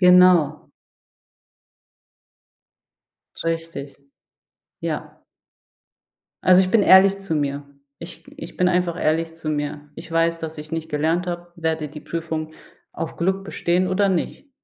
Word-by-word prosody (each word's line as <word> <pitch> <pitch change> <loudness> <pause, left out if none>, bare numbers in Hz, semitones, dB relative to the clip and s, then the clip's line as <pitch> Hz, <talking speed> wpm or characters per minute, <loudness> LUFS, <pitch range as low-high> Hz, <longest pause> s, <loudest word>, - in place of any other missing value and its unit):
Genau. 180 -4 +5 2.7
Richtig. 165 -4 -4 0.8
Ja. - - -5 1.2
Also, 185 0 +6
ich 185 0 +1
bin 220 -3 +4
ehrlich 195 +1 +6
zu 195 -4 -3
mir. 145 -1 -2 0.3
Ich 170 - -11
ich 300 - -9
bin 180 - +3
einfach 180 -1 0
ehrlich 165 +1 0
zu 160 -1 -7
mir. 145 0 -4
Ich 165 +1 -11
weiß, 165 0 +1
dass 160 -1 -6
ich 150 +1 -9
nicht 160 0 -4
gelernt 160 +4 0
habe, 175 0 -5
werde 160 -2 -2
die 150 +1 -10
Prüfung 160 -1 -4 0.4
auf 165 -1 -5
Glück 190 +3 0
bestehen 180 -1 0
oder 195 +2 +2
nicht. 190 - -2
165 Hz, 125 wpm, -22 LUFS, 155-180 Hz, 2.7 s, Also